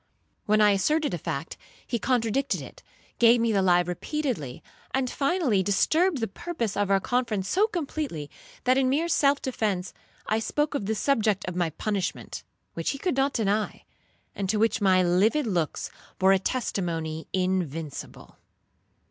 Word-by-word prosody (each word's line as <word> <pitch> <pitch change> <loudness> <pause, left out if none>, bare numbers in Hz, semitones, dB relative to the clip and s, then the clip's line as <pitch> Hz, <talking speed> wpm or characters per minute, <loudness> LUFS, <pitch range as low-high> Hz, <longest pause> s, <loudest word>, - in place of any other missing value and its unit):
When 215 +1 +4
I 210 -1 +6
asserted 300 - +1
a 175 - -2
fact, 140 +3 -4 0.3
he 235 - -2
contradicted 250 +2 0
it, - - -11 0.4
gave 235 0 +6
me 230 0 +2
the 200 -2 +2
lie 180 -2 +4
repeatedly, 180 - -3 0.3
and 265 -1 +1
finally 275 - +1
disturbed 310 - +2
the 225 - 0
purpose 230 - -4
of 205 -1 0
our 195 0 +4
conference 230 -4 -1
so 405 - +3
completely, 295 - -4 0.4
that 255 +1 +3
in 260 -1 +2
mere 305 +6 +1
self 285 -4 +2
defence, 205 -8 -2 0.3
I 220 - +1
spoke 295 +7 -1
of 210 -9 -2
the 220 - 0
subject 215 -5 +1
of 180 - -4
my 175 -2 +1
punishment, 195 +3 -3 0.3
which - - -2
he 275 - -2
could 350 +2 -1
not 270 +1 +1
deny, 215 -1 -1 0.5
and 195 -2 -3
to 215 - +2
which 225 0 +2
my 185 -2 +4
livid 205 +12 +3
looks 175 -8 -2 0.3
bore 190 +1 +4
a 195 - +3
testimony 170 -9 -2
invincible. 175 -5 -3
215 Hz, 160 wpm, -26 LUFS, 185-270 Hz, 0.5 s, I